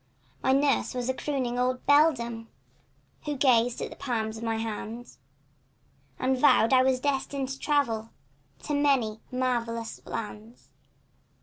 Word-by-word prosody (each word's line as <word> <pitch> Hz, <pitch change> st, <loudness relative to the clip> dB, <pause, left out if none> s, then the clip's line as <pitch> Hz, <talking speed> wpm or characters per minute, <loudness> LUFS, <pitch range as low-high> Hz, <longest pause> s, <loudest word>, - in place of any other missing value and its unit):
My 265 Hz, -, +2 dB
nurse 275 Hz, -1 st, +2 dB
was 250 Hz, 0 st, -2 dB
a -, -, +2 dB
crooning 255 Hz, -3 st, -2 dB
old 255 Hz, 0 st, 0 dB
beldame 235 Hz, -7 st, +3 dB, 0.8 s
Who 295 Hz, -2 st, -2 dB
gazed 245 Hz, -3 st, +3 dB
in -, -, -5 dB
the -, -, -9 dB
palms 220 Hz, -4 st, -3 dB
of 225 Hz, -, -8 dB
my 225 Hz, -1 st, -1 dB
hands 225 Hz, +2 st, -6 dB, 1.0 s
And 260 Hz, +1 st, +1 dB
vowed 255 Hz, -3 st, +5 dB
I 255 Hz, -, +7 dB
was 260 Hz, 0 st, +2 dB
destined 275 Hz, -1 st, -2 dB
to 270 Hz, 0 st, -6 dB
travel 230 Hz, -7 st, 0 dB, 0.6 s
In 290 Hz, -1 st, 0 dB
many 245 Hz, -7 st, +2 dB
and 255 Hz, -, -5 dB
marvellous 230 Hz, -3 st, -2 dB
lands. 220 Hz, +2 st, -7 dB
250 Hz, 140 wpm, -27 LUFS, 230-270 Hz, 1.0 s, I